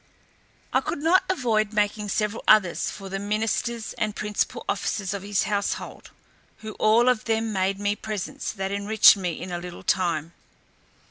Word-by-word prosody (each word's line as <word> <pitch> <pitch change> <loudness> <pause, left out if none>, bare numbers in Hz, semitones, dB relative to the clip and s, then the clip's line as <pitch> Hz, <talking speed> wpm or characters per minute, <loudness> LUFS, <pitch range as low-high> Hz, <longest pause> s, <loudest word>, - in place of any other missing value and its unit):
I - - +3
could - - -3
not 370 +4 +4
avoid 220 - +1
making 210 0 0
several 210 +2 -1
others 205 -5 +4
for 195 - -8
the 195 0 -4
ministers 220 +3 -2
and 215 -2 -1
principal 210 -1 -2
officers 200 -1 -2
of 200 - -4
his 200 +1 0
household, 205 -1 -3 0.5
who 220 0 -6
all 225 +3 +4
of 250 -4 +2
them 225 -1 0
made 190 0 0
me 205 0 0
presents 210 -3 -5
that 195 0 -4
enriched 200 +2 +6
me 180 -4 -3
in 180 - -7
a 175 - -3
little 175 0 -9
time. 165 -3 0
205 Hz, 160 wpm, -25 LUFS, 195-220 Hz, 0.5 s, enriched